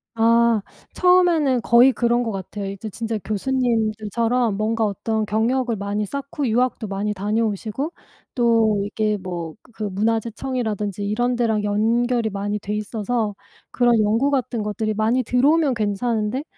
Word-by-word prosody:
아. 230 Hz, -1 st, +4 dB, 0.3 s
처음에는 345 Hz, -8 st, +3 dB
거의 240 Hz, +3 st, +6 dB
그런 240 Hz, -1 st, +1 dB
것 225 Hz, -, -2 dB
같아요. 200 Hz, +1 st, -6 dB
이제 200 Hz, +3 st, -6 dB
진짜 225 Hz, +2 st, -3 dB
교수님들처럼 225 Hz, -1 st, 0 dB
뭔가 220 Hz, +1 st, 0 dB
어떤 215 Hz, +2 st, -1 dB
경력을 230 Hz, +3 st, 0 dB
많이 205 Hz, +1 st, -2 dB
쌓고 280 Hz, +4 st, -4 dB
유학도 240 Hz, 0 st, 0 dB
많이 200 Hz, +1 st, -2 dB
다녀오시고 215 Hz, -, -2 dB, 0.4 s
또 230 Hz, -4 st, +3 dB
이게 210 Hz, 0 st, -1 dB
뭐 175 Hz, -4 st, -6 dB, 0.2 s
그 220 Hz, -, -6 dB
문화재청이라든지 220 Hz, 0 st, -2 dB
이런 240 Hz, +5 st, 0 dB
데랑 225 Hz, -3 st, 0 dB
연결이 230 Hz, +3 st, +1 dB
많이 205 Hz, +1 st, -3 dB
돼 205 Hz, +1 st, -4 dB
있어서 215 Hz, 0 st, -2 dB, 0.4 s
그런 240 Hz, -1 st, +3 dB
연구 225 Hz, +7 st, +2 dB
같은 255 Hz, -4 st, -1 dB
것들이 215 Hz, +1 st, -2 dB
많이 225 Hz, +4 st, +1 dB
들어오면 280 Hz, +4 st, +3 dB
괜찮은데 220 Hz, +3 st, -1 dB
225 Hz, 320 characters per minute, -22 LUFS, 210-245 Hz, 0.4 s, 거의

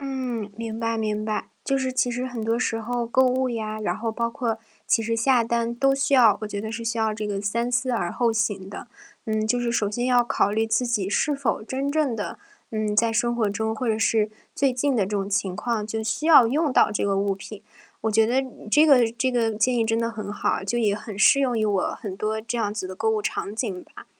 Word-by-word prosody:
嗯， 255 Hz, -6 st, -4 dB
明 225 Hz, -1 st, -5 dB
白 230 Hz, 0 st, -1 dB
明 215 Hz, -1 st, -2 dB
白。 215 Hz, -1 st, -3 dB, 0.2 s
就 275 Hz, -1 st, +1 dB
是 260 Hz, -1 st, -1 dB
其 250 Hz, -1 st, +1 dB
实 245 Hz, +2 st, -3 dB
很 240 Hz, -3 st, -5 dB
多 225 Hz, +1 st, +1 dB
时 225 Hz, -2 st, -1 dB
候 240 Hz, +1 st, -2 dB
购 260 Hz, +3 st, +3 dB
物 255 Hz, +1 st, +1 dB
呀， 215 Hz, -2 st, -4 dB
然 215 Hz, -, -1 dB
后 225 Hz, 0 st, -3 dB
包 235 Hz, +1 st, -1 dB
括 230 Hz, -1 st, -2 dB, 0.3 s
其 225 Hz, -, +2 dB
实 230 Hz, +1 st, -1 dB
下 245 Hz, +1 st, +3 dB
单 235 Hz, 0 st, -1 dB
都 270 Hz, +3 st, +2 dB
需 275 Hz, +1 st, -1 dB
要 235 Hz, -6 st, +6 dB
我 -, -, -2 dB
觉 205 Hz, -1 st, -4 dB
得 220 Hz, +1 st, -5 dB
是 230 Hz, +1 st, -5 dB
需 230 Hz, 0 st, -2 dB
要 220 Hz, -1 st, +1 dB
这 210 Hz, 0 st, -4 dB
个 200 Hz, -1 st, -2 dB
三 235 Hz, +4 st, -1 dB
思 255 Hz, +1 st, +1 dB
而 200 Hz, -8 st, -1 dB
后 235 Hz, -2 st, +1 dB
行 205 Hz, -4 st, -1 dB
的。 200 Hz, -, -8 dB, 0.4 s
嗯， 215 Hz, 0 st, -1 dB
就 245 Hz, +3 st, +1 dB
是 240 Hz, -1 st, -1 dB
首 210 Hz, -3 st, 0 dB
先 240 Hz, +4 st, -2 dB
要 250 Hz, -1 st, +4 dB
考 225 Hz, -4 st, +1 dB
虑 220 Hz, +2 st, +1 dB
自 225 Hz, +3 st, +1 dB
己 215 Hz, -5 st, 0 dB
是 290 Hz, +8 st, +1 dB
否 275 Hz, -5 st, -1 dB
真 265 Hz, +5 st, -3 dB
正 295 Hz, -4 st, +1 dB
的， 210 Hz, -, -5 dB, 0.3 s
嗯， 215 Hz, -1 st, -1 dB
在 230 Hz, +2 st, +3 dB
生 240 Hz, +1 st, +1 dB
活 225 Hz, -3 st, +1 dB
中， 220 Hz, +2 st, -2 dB
或 235 Hz, +2 st, -3 dB
者 220 Hz, -1 st, +1 dB
是 220 Hz, -1 st, +2 dB, 0.2 s
最 275 Hz, -2 st, +2 dB
近 275 Hz, +2 st, +1 dB
的 215 Hz, -5 st, +2 dB
这 190 Hz, -, -7 dB
种 200 Hz, -2 st, -1 dB
情 195 Hz, -2 st, -1 dB
况， 225 Hz, -1 st, -2 dB
就 220 Hz, +1 st, -3 dB
需 225 Hz, +8 st, -2 dB
要 295 Hz, -7 st, +8 dB
用 295 Hz, +6 st, +1 dB
到 -, -, +4 dB
这 210 Hz, -, -1 dB
个 200 Hz, -1 st, +1 dB
物 200 Hz, 0 st, +1 dB
品。 200 Hz, +2 st, -10 dB, 0.4 s
我 220 Hz, -, +1 dB
觉 220 Hz, +1 st, +4 dB
得 255 Hz, +4 st, +2 dB, 0.3 s
这 300 Hz, +7 st, +6 dB
个 250 Hz, -7 st, +5 dB
这 250 Hz, +2 st, 0 dB
个 235 Hz, -2 st, +1 dB
建 225 Hz, +4 st, +1 dB
议， 230 Hz, -, +2 dB
真 225 Hz, 0 st, +1 dB
的 230 Hz, 0 st, -1 dB
很 215 Hz, -3 st, -6 dB
好， 205 Hz, -, -1 dB
就 195 Hz, +5 st, -2 dB
也 215 Hz, -4 st, +2 dB
很 210 Hz, -1 st, -8 dB
适 275 Hz, +6 st, +6 dB
用 250 Hz, -4 st, +1 dB
于 215 Hz, -, +1 dB
我 205 Hz, -3 st, 0 dB
很 200 Hz, -5 st, -4 dB
多 215 Hz, +2 st, -2 dB
这 235 Hz, +2 st, -4 dB
样 205 Hz, -2 st, -1 dB
子 210 Hz, -3 st, -3 dB
的 185 Hz, -, -7 dB
购 220 Hz, +4 st, -1 dB
物 220 Hz, -1 st, +1 dB
场 205 Hz, -1 st, -3 dB
景 200 Hz, -6 st, -3 dB
吧。 -, -, -14 dB
225 Hz, 275 characters per minute, -24 LUFS, 215-245 Hz, 0.4 s, 要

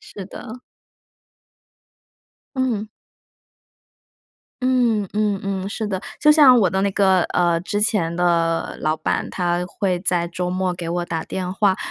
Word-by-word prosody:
是 195 Hz, -, -10 dB
的。 240 Hz, +4 st, -9 dB, 2.0 s
嗯。 235 Hz, -5 st, -1 dB, 1.7 s
嗯 240 Hz, -5 st, +2 dB
嗯 210 Hz, -2 st, 0 dB
嗯， 195 Hz, -1 st, -3 dB
是 215 Hz, +1 st, -4 dB
的。 190 Hz, -2 st, -3 dB, 0.2 s
就 300 Hz, -, +6 dB
像 270 Hz, -5 st, +7 dB
我 190 Hz, -5 st, +3 dB
的 190 Hz, -, 0 dB
那 200 Hz, +1 st, +1 dB
个， 190 Hz, -2 st, +3 dB
呃， 170 Hz, -1 st, +1 dB
之 205 Hz, +3 st, -2 dB
前 195 Hz, -7 st, 0 dB
的 170 Hz, -1 st, 0 dB
老 155 Hz, +1 st, 0 dB
板， 155 Hz, -, -2 dB
他 175 Hz, -1 st, -1 dB
会 185 Hz, -1 st, -1 dB
在 175 Hz, -2 st, 0 dB
周 180 Hz, +1 st, -3 dB
末 185 Hz, 0 st, -1 dB
给 170 Hz, -1 st, -6 dB
我 175 Hz, +1 st, -1 dB
打 165 Hz, -2 st, -3 dB
电 185 Hz, -1 st, -4 dB
话， 195 Hz, -1 st, +2 dB
190 Hz, 150 characters per minute, -21 LUFS, 175-210 Hz, 2.0 s, 像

